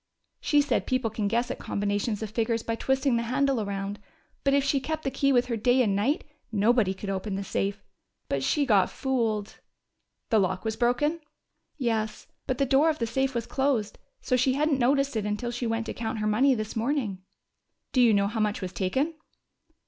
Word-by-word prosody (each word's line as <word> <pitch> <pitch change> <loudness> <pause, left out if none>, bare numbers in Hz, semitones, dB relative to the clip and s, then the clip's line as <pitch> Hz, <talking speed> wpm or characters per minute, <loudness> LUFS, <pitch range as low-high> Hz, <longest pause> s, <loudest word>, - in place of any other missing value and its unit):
She 295 -1 +3
said 285 - 0
people 255 -4 0
can 210 -1 -1
guess 235 +4 0
at - - -5
combinations 205 +2 -1
of 215 - -5
figures 230 0 0
by 230 - -2
twisting 265 +1 +1
the - - 0
handle 255 +1 +1
around, 200 0 -4 0.4
but 275 0 +3
if 280 - +3
she 275 0 +2
kept 310 +3 -4
the 270 - -1
key 275 +1 +2
with 245 -2 +4
her 245 -2 -2
day 245 +3 +3
and 200 -4 +1
night, 245 +10 +1 0.3
nobody 210 -2 +2
could 195 +1 -5
open 195 +1 -3
the 200 - -3
safe.... 200 +1 -2 0.4
But 140 - -1
she 290 - +2
got 205 -7 +4
fooled!" 225 -6 -2 0.7
"The 220 - +5
lock 185 +1 -1
was 220 0 -1
broken?" 245 +8 +1 0.6
"Yes. 220 -5 -1 0.2
But 255 - -1
the 275 - +2
door 275 +4 +4
of 310 - 0
the 230 - -1
safe 265 +3 -1
was 235 -1 -1
closed, 265 -6 -1 0.2
so 255 - +1
she 255 +1 +3
hadn't 290 0 +1
noticed 275 +2 +2
it 210 -2 -1
until 210 +3 -2
she 240 0 -3
went 225 0 -1
to - - -4
count 225 -1 -3
her 215 - -2
money 255 +6 +3
this 215 -1 -4
morning." 225 -5 -1 0.7
"Do 255 - +3
you 235 -2 +6
know 200 -1 +3
how 215 +3 -2
much 210 -1 0
was 185 -2 -5
taken?" 260 - 0
230 Hz, 205 wpm, -27 LUFS, 210-265 Hz, 0.7 s, you